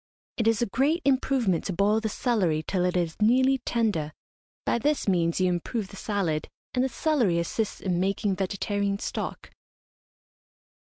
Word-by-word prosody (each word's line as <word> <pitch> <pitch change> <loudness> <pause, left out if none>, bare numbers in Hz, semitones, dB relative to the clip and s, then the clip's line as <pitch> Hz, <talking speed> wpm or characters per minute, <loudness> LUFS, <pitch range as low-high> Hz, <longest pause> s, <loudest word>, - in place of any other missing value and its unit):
It 225 - +1
is 225 0 +3
a 205 - -4
great 300 +7 +2
improvement 260 -9 +2
to 190 - -2
boil 205 +4 +2
the 220 0 -2
celery 190 -10 0
till 180 0 0
it 180 0 +1
is 170 +2 -2
nearly 260 +4 +4
tender. 205 -13 -1 0.5
By - - +1
this 295 +2 0
means 170 -3 +2
you 185 - +3
improve 190 +4 -2
the - - -11
salad, 185 -7 -2 0.2
and 250 - +2
the 265 - 0
celery 250 - +1
assists 195 +6 -2
in 180 -2 -1
making 195 +1 0
vegetarian 200 +1 -1
stock. - - -5
200 Hz, 160 wpm, -27 LUFS, 180-240 Hz, 0.5 s, nearly